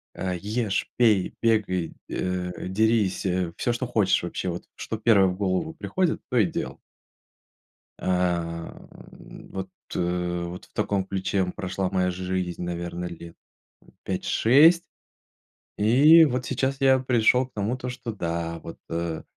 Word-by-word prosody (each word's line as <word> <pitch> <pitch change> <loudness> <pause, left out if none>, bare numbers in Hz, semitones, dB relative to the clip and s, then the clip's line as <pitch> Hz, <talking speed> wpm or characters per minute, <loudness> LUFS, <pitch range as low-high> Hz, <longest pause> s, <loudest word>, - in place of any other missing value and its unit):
Э, 95 -1 -2
ешь, 105 0 -1
пей, 110 -6 +3
бегай, 105 -7 +1 0.2
э, 90 -1 -3
дерись, 110 -1 +1
э, 90 -2 0
всё, 120 - 0
что 120 +1 -3
хочешь 110 -5 +2
вообще. 90 +1 -3
Вот, 85 - -5
что 110 - -5
первое 105 -3 +5
в 90 - -2
голову 100 - -1
приходит, 185 -4 -1
то 125 - 0
и 105 - +5
делал. - - -4 1.2
А, 85 -2 -1 0.5
н - - -13
вот, 95 0 -5 0.2
э, 90 0 -1
вот 85 +1 -7
в - - -33
таком 100 -2 0
ключе, 95 +1 -2
м, 90 -1 +1
прошла 95 -1 -2
моя 90 -1 +1
жизнь, 90 -1 -3
наверно, 85 0 -4
лет, 85 -1 -9 0.5
м, - - -21
5-6. 160 +9 +4 0.9
И 145 +10 +7
вот 130 -3 -1
сейчас 135 0 -1
я 130 -1 +5
пришел 125 0 +3
к - - -32
тому 105 +5 -1
то, 125 0 -5
что, 125 -2 -5
да, 85 -3 -3
вот, 85 - -8
а, 85 -1 -3
95 Hz, 150 wpm, -25 LUFS, 90-120 Hz, 1.2 s, И